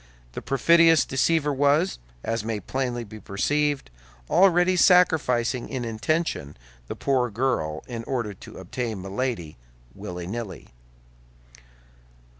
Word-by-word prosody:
The - - -6
perfidious 165 +4 +4
deceiver 150 +2 +1
was, 145 +6 +2 0.2
as 115 -1 -2
may 110 -1 -3
plainly 125 +3 -3
be 110 0 -11
perceived, 145 - -1 0.4
already 180 -1 +4
sacrificing, 145 -10 +3
in 130 -3 -3
intention, 115 - -2 0.3
the - - -5
poor 130 -3 0
girl 105 -10 -1
in 115 -2 -6
order 120 -6 -2
to - - -13
obtain 110 +3 -4
Milady, 95 - -3 0.4
willy 90 -1 -7
nilly. 100 -2 -6
125 Hz, 110 wpm, -25 LUFS, 105-150 Hz, 0.4 s, perfidious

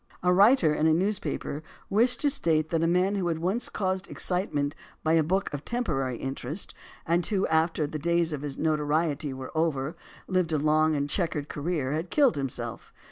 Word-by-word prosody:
A 180 0 +4
writer 195 - +5
in 155 +1 +2
a 160 - +5
newspaper 190 -5 -2 0.3
wished 230 +4 +2
to 290 - +3
state 155 - +1
that 165 -1 +1
a 165 - +2
man 180 +3 +2
who 190 -3 -1
had 165 -2 0
once 185 +9 -1
caused 190 -1 -2
excitement 150 -6 -1 0.3
by 160 - +2
a 165 - +5
book 185 +4 -1
of 145 0 -4
temporary 145 - -1
interest 135 - -4 0.3
and 170 +2 +2
who, 200 -3 +1
after 160 0 +2
the 155 +1 -5
days 170 +1 +1
of 145 - -4
his 145 -2 -5
notoriety 150 -1 0
were 130 +3 -8
over, 155 -1 0 0.3
lived 185 -4 0
a - - +3
long 155 +1 +3
and 140 0 -1
checkered 155 -3 -1
career, 150 -3 -2
had 160 +4 -2
killed 280 -1 +4
himself. 125 -4 -5
160 Hz, 190 wpm, -27 LUFS, 150-185 Hz, 0.3 s, writer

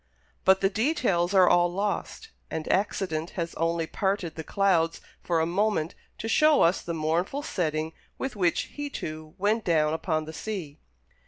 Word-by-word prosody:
But 190 0 +5
the 195 - +3
details 215 - +1
are 185 -2 +7
all 175 0 +4
lost, 205 - -3 0.2
and 160 -1 -4
accident 185 -4 -1
has 170 -1 -2
only 165 0 0
parted 190 -1 -1
the 160 - -6
clouds 175 -4 +2 0.2
for 170 -2 0
a 160 - +2
moment 180 -2 0 0.2
to 225 - -4
show 305 +5 +5
us 170 +3 +3
the 170 - -4
mournful 170 - -1
setting 160 - -2 0.2
with 265 -3 -4
which 180 -4 +2
he, 290 0 -4
too, 155 - -7
went 210 +3 +1
down 155 -4 +2
upon 160 -1 -1
the 160 - -8
sea. 165 -6 -5
175 Hz, 165 wpm, -27 LUFS, 160-205 Hz, 0.2 s, are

